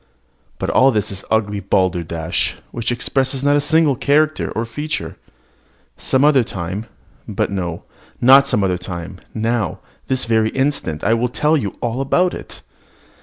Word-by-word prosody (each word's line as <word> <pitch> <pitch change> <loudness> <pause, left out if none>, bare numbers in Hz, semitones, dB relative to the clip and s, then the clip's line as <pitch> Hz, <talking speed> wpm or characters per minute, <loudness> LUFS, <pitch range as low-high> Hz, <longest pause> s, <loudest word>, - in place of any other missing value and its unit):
But - - -2
all 130 - +5
this 105 -3 0
is 100 0 -6
ugly 105 -2 0
balderdash, 85 -4 -1 0.2
which 120 0 -2
expresses 130 +2 -1
not 145 0 +4
a 145 - +3
single 150 -1 +3
character 150 +4 +1
nor 115 - -1
feature. 145 - -4 0.8
Some 130 +2 +1
other 140 -4 +5
time 95 +2 -5 0.4
but - - -1
no, 90 -4 -3 0.4
not 135 +3 +7
some 105 - +1
other 90 -2 0
time, 90 0 -7 0.2
now, 110 -3 -1 0.3
this 130 -1 0
very 110 -1 +2
instant, 135 - -1
will 115 +3 +2
I - - +2
tell 150 +5 +1
you 105 - -2
all 120 +2 -1
about 180 +7 +2
it. - - -9
115 Hz, 155 wpm, -19 LUFS, 95-140 Hz, 0.8 s, not